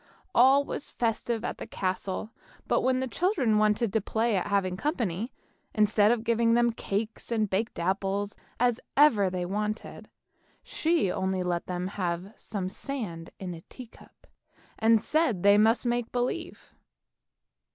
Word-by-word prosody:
All 265 +4 +6
was 285 - -5
festive 230 0 -1
at - - -4
the - - -6
castle, 190 +3 -3 0.4
but - - +2
when 260 0 +1
the 260 - -1
children 255 - +1
wanted 215 0 +2
to 220 - +2
play 225 +2 0
at 185 - 0
having 195 -2 +1
company, 230 - -2 0.4
instead 210 -1 +4
of 235 -1 0
having 230 0 +2
as - - +4
many 240 0 +3
cakes 220 +1 -4
and 220 -2 +1
baked 200 +4 -2
apples 195 +3 -1 0.2
as 245 -1 +2 0.2
ever 225 -10 +5
they 180 -1 -3
wanted, 210 +3 -4 0.5
she 320 - +1
would - - 0
only 190 -1 0
let 175 -1 -2
them 180 0 -3
have 185 0 -3
some 195 -4 -4
sand 190 -7 -5
in 185 -2 -5
a 165 - -9
tea 255 - -9
cup, 230 - -20 0.5
and 225 0 +5
said 305 - +1
they 200 +1 +6
must 225 +3 +3
make 240 -1 -1
believe. 250 +8 -3
215 Hz, 160 wpm, -28 LUFS, 190-240 Hz, 0.5 s, All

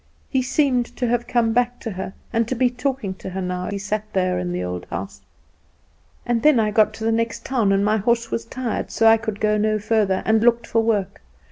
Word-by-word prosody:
He 265 - +2
seemed 255 -2 +1
to 250 - 0
have 240 0 0
come 230 -2 +1
back 245 +1 +1
to 225 - -4
her, 190 0 -6 0.2
and 230 -1 +1
to 255 - -2
be 250 0 +2
talking 250 -5 -2
to 190 - -8
her 190 +1 -5
now 180 0 -3
he 200 - -3
sat 205 +1 -2
there 185 - +1
in 90 0 -3
the 90 +1 -2
old 90 0 -4
house. 95 +3 -6 0.5
" - - -37
and 240 -1 0
then 300 -3 +5
I 215 -1 +1
got 215 0 +4
to 220 - -8
the 225 - +2
next 230 0 -1
town, 235 -7 +1
and 195 +1 +2
my 215 +1 +2
horse 230 +2 0
was 230 - -2
tired, 255 -4 -3
so 225 - 0
I 225 0 +7
could 220 -2 -5
go 210 0 +2
no 215 0 +1
further, 210 -3 +1
and 220 0 +3
looked 235 0 +3
for 225 - +1
work. 215 -4 -1
225 Hz, 240 wpm, -22 LUFS, 200-240 Hz, 0.5 s, I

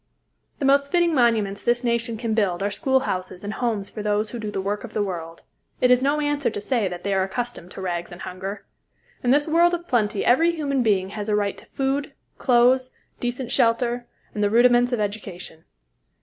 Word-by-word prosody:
The 280 - -2
most 280 +1 +3
fitting 345 -2 +3
monuments 220 -6 +2
this 240 +2 +1
nation 235 -1 -1
can 225 -1 -2
build 195 -4 +1
are 205 - 0
schoolhouses 200 -6 -1
and 205 +1 -4
homes 220 -5 -1
for 210 - -7
those 210 0 0
who 240 - -5
do 215 -2 -4
the 205 - -3
work 200 +2 -2
of 240 - -9
the 210 - +1
world. 170 -4 -6 0.4
It 250 - +4
is 250 0 +5
no 285 +3 +1
answer 290 -1 0
to 220 - -5
say 225 -1 0
that 180 -1 -6
they 200 - 0
are 190 - +2
accustomed 195 -1 -4
to - - -8
rags 175 -2 -3
and 175 +1 -10
hunger. 195 +2 -6 0.6
In 245 - +1
this 290 +4 +4
world 340 +2 +4
of 345 0 -8
plenty 215 -4 +1
every 330 +8 +4
human 280 -4 0
being 195 -5 +1
has 210 +1 -5
a 210 - +2
right 205 -1 0
to - - -16
food, 275 +1 -2 0.3
clothes, 255 +1 +3 0.2
decent 245 0 -3
shelter, 240 +1 +1 0.3
and 210 - -1
the 205 - +3
rudiments 240 +2 +4
of 245 - 0
education. 200 -6 -5
230 Hz, 205 wpm, -23 LUFS, 200-255 Hz, 0.6 s, is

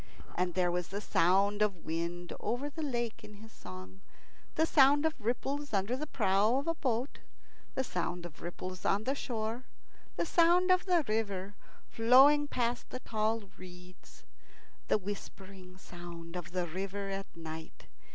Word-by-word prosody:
And 180 -1 -1
there 180 -1 +2
was 180 -1 -1
the 200 +2 -4
sound 200 +2 +3
of 200 -5 0
wind 170 +2 -3
over 275 +5 -2
the 320 - -6
lake 240 -6 -2
in 210 - -11
his 220 +2 -13
song, 95 - -11 0.5
the 320 - +4
sound 290 -1 +5
of 320 - +2
ripples 270 +5 -2
under 200 +5 +1
the 305 +4 -4
prow 210 0 +3
of 280 - -1
a 330 - +1
boat, 255 -4 -2 0.6
the 265 - +1
sound 180 -5 -3
of 160 -3 -10
ripples 185 +1 -6
on 205 +2 +2
the 265 - 0
shore, 235 -2 -3 0.5
the - - 0
sound 350 +2 +4
of 365 0 +4
the 345 -5 +3
river 205 -3 -1 0.3
flowing 270 +6 +6
past 240 -3 -1
the 255 - -6
tall 220 0 0 0.2
reeds, 180 0 -13 0.6
the - - +4
whispering 190 -2 -8
sound 175 -2 -9
of 175 -2 -5
the 180 -1 -1
river 195 +3 -4
at 195 0 -4
night. 160 -1 -8
205 Hz, 160 wpm, -32 LUFS, 180-255 Hz, 0.6 s, flowing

